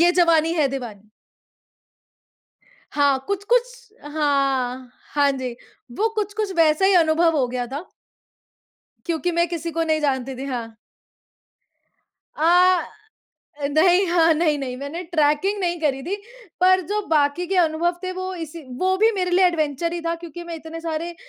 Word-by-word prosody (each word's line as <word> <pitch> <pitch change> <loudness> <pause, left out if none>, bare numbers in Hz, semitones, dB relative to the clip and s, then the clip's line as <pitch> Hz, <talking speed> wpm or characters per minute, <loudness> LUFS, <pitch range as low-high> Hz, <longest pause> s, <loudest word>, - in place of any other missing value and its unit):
ये 345 +1 +6
जवानी 335 -2 +3
है 300 -4 +2
दीवानी? 220 -6 -7 1.8
हाँ, 285 -2 +2
कुछ-कुछ 475 +3 -1
हाँ, 275 -4 -1 0.2
हाँ 285 -1 +3
जी। 260 -2 -4 0.5
वो 445 +2 +2
कुछ-कुछ 420 -1 -2
वैसा 320 +2 +4
ही 390 - +4
अनुभव 325 -1 +3
हो 255 -3 +1
गया 245 0 -3
था। 285 +8 -6 1.2
क्योंकि 345 +1 -1
मैं 340 +1 +1
किसी 335 -1 -4
को 330 +1 -1
नहीं 315 -1 0
जानती 265 -2 -1
थी, 270 - -5
हाँ। 235 -4 -5 1.6
अ, 355 +2 +4 0.8
नहीं, 355 +5 +4
हाँ, 335 -1 +4
नहीं, 305 -2 +1
नहीं, 255 -2 -4
मैंने 285 +6 -6
ट्रैकिंग 310 +6 +2
नहीं 345 -1 -1
करी 270 -3 0
थी। 385 +6 -3 0.4
पर 370 0 +5
जो 420 +2 -1
बाकी 305 +3 +1
के 385 +1 -1
अनुभव 345 +1 +1
थे 370 0 -3
वो 370 0 -5
इसी 330 -1 -7 0.2
वो 375 +2 +1
भी 445 +2 +5
मेरे 365 -3 -1
लिए 365 +1 +5
एडवेंचर 330 -1 -1
ही 345 - -3
था 335 - 0
क्योंकि 340 0 -9
मैं 340 -1 -6
इतने 325 +1 -8
सारे 330 +1 -4
330 Hz, 150 wpm, -22 LUFS, 285-360 Hz, 1.8 s, ये